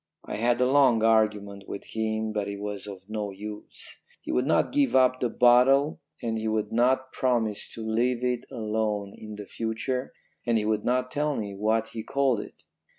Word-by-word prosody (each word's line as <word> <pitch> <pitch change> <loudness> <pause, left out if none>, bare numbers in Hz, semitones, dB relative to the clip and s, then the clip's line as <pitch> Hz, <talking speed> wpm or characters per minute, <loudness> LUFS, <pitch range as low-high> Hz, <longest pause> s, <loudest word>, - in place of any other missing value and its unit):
I - - -4
had 120 +2 +2
a 125 - +4
long 130 -4 +4
argument 105 -3 +2
with 100 - -6
him, 110 0 -2
but 105 -1 -1
it 100 0 -5
was 105 -1 -5
of 95 -1 -9
no 105 -1 -3
use. 105 +2 -9 0.2
He - - -6
would 125 +2 +1
not - - +2
give 280 - +2
up 130 -1 +4
the 125 - 0
bottle 125 +5 +4 0.2
and 115 -1 -1
he 110 - -3
would 110 -1 -1
not 130 +3 +2
promise 115 -5 0
to 115 - -6
leave 120 +2 +1
it 125 -1 0
alone 105 -2 -2
in 110 -1 -9
the 105 0 -8
future, 115 +5 -3 0.3
and 120 -1 +2
he 105 - 0
would 110 -1 0
not 125 +1 0
tell 150 +1 0
me 100 -2 -4
what 110 +3 0
he 115 - -6
called 135 -1 +1
it. - - -10
110 Hz, 195 wpm, -27 LUFS, 105-125 Hz, 0.3 s, a